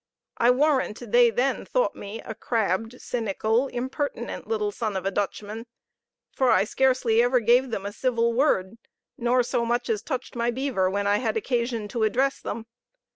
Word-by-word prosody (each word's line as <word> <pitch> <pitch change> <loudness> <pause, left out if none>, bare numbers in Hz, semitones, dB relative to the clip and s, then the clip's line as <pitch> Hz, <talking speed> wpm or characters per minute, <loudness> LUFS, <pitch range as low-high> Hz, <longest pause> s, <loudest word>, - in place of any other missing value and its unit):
I 235 - +4
warrant 255 -5 +1
they 240 0 +6
then 250 +4 0
thought - - 0
me 205 +3 -7
a 220 - -7
crabbed, 225 +1 -1
cynical, 225 +2 0
impertinent 265 +4 -4
little 430 -2 -1
son 220 - -3
of 190 - -5
a 195 - +1
Dutchman; 210 +3 -4 0.7
for 260 -2 +2
I - - +5
scarcely 250 0 +2
ever 245 +1 +3
gave 245 +3 +3
them 200 -4 -4
a 200 - -3
civil 235 -1 +1
word, 230 -5 +1 0.4
nor 245 +1 +2
so 240 -1 -1
much 240 +1 0
as 210 -2 -1
touched 260 -4 -5
my 235 0 0
beaver, 240 -7 0
when 200 +1 -1
I 205 +1 +3
had 225 -1 -1
occasion 235 -2 -1
to 235 - -3
address 255 +6 +1
them. 225 - -5
235 Hz, 175 wpm, -25 LUFS, 215-255 Hz, 0.7 s, they